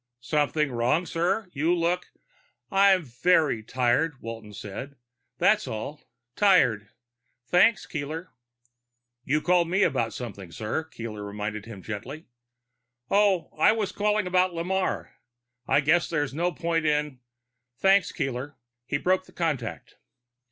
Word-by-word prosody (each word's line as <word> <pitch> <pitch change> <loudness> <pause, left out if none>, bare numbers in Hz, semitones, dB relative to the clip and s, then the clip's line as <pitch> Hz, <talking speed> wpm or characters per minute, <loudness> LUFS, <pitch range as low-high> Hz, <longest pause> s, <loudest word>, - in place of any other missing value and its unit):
"Something 150 +2 0
wrong, 125 +9 +1
sir? 180 +5 -1
You 160 +5 +2
look 175 +1 0 0.3
" - - -37 0.3
"I'm 195 -2 +5
very 140 0 +2
tired," 130 +6 0
Walton 115 -3 -8
said. 105 +7 -7 0.4
"That's - - +3
all. 140 +7 -5 0.3
Tired. 125 - +3 0.6
Thanks, 180 - +4
Keeler." 155 +3 -5 0.9
"You 150 +4 +1
called 175 -1 +3
me 190 +3 +3
about 115 -9 +1
something, 100 -8 -7
sir," 110 - -3
Keeler 115 -8 -7
reminded 105 +1 -5
him 100 -5 -9
gently. 130 +9 -6 0.9
"Oh, 200 -3 +3
I - - +6
was 210 -3 -2
calling 210 0 +1
about 180 -1 +2
Lamarre. 185 +3 -1 0.6
I 145 - +4
guess 165 +4 +2
there's 145 -4 -1
no 175 +4 0
point 165 -2 -1
in 150 -3 0 0.6
thanks, 195 +2 +4
Keeler." 135 -2 -4 0.3
He 140 - 0
broke 185 +4 +1
the - - -18
contact. 150 -9 -3
150 Hz, 130 wpm, -26 LUFS, 120-180 Hz, 0.9 s, I